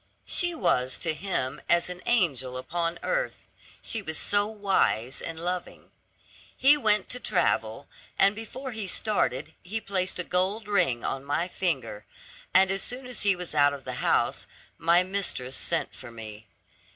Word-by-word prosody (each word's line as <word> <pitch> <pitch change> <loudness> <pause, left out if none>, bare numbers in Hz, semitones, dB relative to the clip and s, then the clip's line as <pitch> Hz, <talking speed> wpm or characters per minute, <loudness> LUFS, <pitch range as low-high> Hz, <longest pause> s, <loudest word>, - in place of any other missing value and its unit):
She 350 -1 +1
was 130 - +2
to 165 -2 -1
him 155 -6 -2
as 170 0 +4
an 180 0 -6
angel 135 - +2
upon 165 +6 -2
earth; - - -2 0.3
she 225 - -1
was 160 -5 -3
so 205 0 +3
wise 195 - +1
and 165 -1 -6
loving. 180 +1 -4 0.7
He 280 +3 +6
went 210 -8 +2
to 250 - -2
travel, - - 0 0.3
and 195 +1 +5
before 255 +5 -7
he 220 -3 -4
started 155 - 0
he 205 +5 -4
placed 190 -3 -1
a 180 - -1
gold 190 +5 0
ring 135 - +2
on 135 - -2
my 145 +5 -1
finger; 135 - -2 0.5
and 190 0 +5
as 195 0 0
soon 250 +1 -2
as 250 0 -5
he 200 -2 +4
was 180 -2 -5
out 145 -1 +4
of 140 -1 -8
the - - -4
house, - - +1 0.3
my 170 +2 +5
mistress 180 -9 -2
sent 170 -1 0
for 130 - -10
me. 110 -2 -9
180 Hz, 165 wpm, -27 LUFS, 140-205 Hz, 0.7 s, He